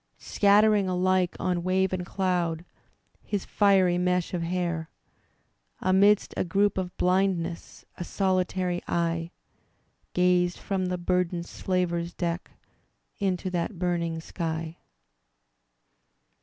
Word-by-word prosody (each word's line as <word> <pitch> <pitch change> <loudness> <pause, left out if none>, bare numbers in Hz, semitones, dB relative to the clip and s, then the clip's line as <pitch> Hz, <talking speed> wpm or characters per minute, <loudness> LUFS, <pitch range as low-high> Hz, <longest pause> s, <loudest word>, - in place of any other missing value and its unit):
Scattering 205 -1 +3
alike 185 0 +1
on 180 -2 0
wave 185 +1 +1
and 180 -1 -2
cloud 175 -3 -1 0.6
His 205 -2 -3
fiery 190 -4 +3
mesh 180 0 0
of 175 - -1
hair. 170 -2 -2 0.9
Amidst 195 +2 +3
a - - 0
group 195 +3 +1
of 180 -1 -5
blindness 180 -2 0
A - - -2
solitary 185 -1 0
eye 165 -1 -1 0.8
Gazed 180 0 +2
from 190 -2 -2
the 180 0 -2
burdened 180 -1 -1
slaver's 175 -2 -2
deck 170 0 -3 0.7
Into 185 -2 -1
that 175 +2 -2
burning 170 -2 -1
sky. 165 -1 -4
180 Hz, 105 wpm, -27 LUFS, 170-185 Hz, 0.9 s, Scattering